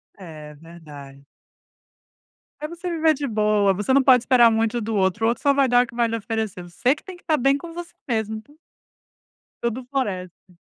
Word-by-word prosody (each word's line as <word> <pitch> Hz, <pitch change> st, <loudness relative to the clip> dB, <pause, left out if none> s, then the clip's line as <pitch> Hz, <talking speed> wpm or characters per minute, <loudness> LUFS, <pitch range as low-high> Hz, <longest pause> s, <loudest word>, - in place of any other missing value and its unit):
É, 155 Hz, -5 st, -11 dB
verdade. 145 Hz, -4 st, -13 dB, 1.3 s
É, 300 Hz, -, -4 dB
você 345 Hz, +2 st, -7 dB
viver 320 Hz, -2 st, +2 dB
de 285 Hz, -1 st, -4 dB
boa, 210 Hz, -2 st, +2 dB
você 205 Hz, +7 st, -1 dB
não 275 Hz, -, +5 dB
pode 255 Hz, -2 st, +5 dB
esperar 240 Hz, -2 st, +5 dB
muito 225 Hz, +1 st, 0 dB
do 220 Hz, 0 st, -3 dB
outro, 195 Hz, +3 st, +1 dB
o -, -, +4 dB
outro 235 Hz, -, -3 dB
só 280 Hz, -1 st, +4 dB
vai 275 Hz, -1 st, +3 dB
dar 245 Hz, 0 st, +5 dB
o -, -, -18 dB
que -, -, -15 dB
vai 235 Hz, -1 st, +2 dB
lhe 230 Hz, -, -3 dB
oferecer, 220 Hz, -4 st, -4 dB
você 245 Hz, -, 0 dB
que -, -, -17 dB
tem 375 Hz, -2 st, -10 dB
que 350 Hz, -, -19 dB
estar 310 Hz, -3 st, 0 dB
bem 275 Hz, +2 st, +3 dB
com 330 Hz, +4 st, -7 dB
você 345 Hz, 0 st, -9 dB
mesmo, 220 Hz, -2 st, -2 dB
então 290 Hz, +8 st, -15 dB, 1.0 s
Tudo 235 Hz, +2 st, -3 dB
floresce. 185 Hz, -8 st, -5 dB
230 Hz, 200 wpm, -22 LUFS, 195-275 Hz, 1.3 s, não